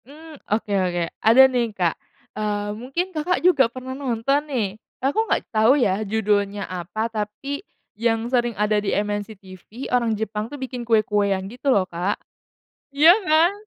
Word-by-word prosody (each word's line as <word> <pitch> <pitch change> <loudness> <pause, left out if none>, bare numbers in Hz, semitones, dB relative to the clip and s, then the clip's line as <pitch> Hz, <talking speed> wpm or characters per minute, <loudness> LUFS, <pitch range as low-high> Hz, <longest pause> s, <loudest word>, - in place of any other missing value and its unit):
Mmm, 305 +2 -13
oke 210 -1 -1
oke, 175 -2 0 0.2
ada 230 +4 +7
nih, 245 -3 +1
Kak, 175 -3 +2 0.4
eee, 205 -1 -2
mungkin, 275 - -4
Kakak, 330 +3 0
juga 280 -10 +5
pernah 255 +2 -7
nonton 270 +1 0
nih, 240 -7 0 0.3
aku 285 - 0
gak - - +1
tau 225 +6 +5
ya 205 -6 +1
judulnya 205 -1 0
apa, 185 +4 -4
tapi 230 +6 -4 0.3
yang 225 +1 0
sering 240 -2 0
ada 210 0 +1
di 205 - -1
MNCTV 205 +2 -5
orang 235 -3 +2
Jepang 215 0 -3
tuh 290 - -8
bikin 260 -2 -5
kue-kue 210 -2 +2
yang 190 -1 -1
gitu 245 +7 -4
loh, 200 -8 +3
Kak, 180 +3 -2 0.8
iya 315 +4 +8 0.2
kan? 320 +4 +5
225 Hz, 160 wpm, -22 LUFS, 205-265 Hz, 0.8 s, iya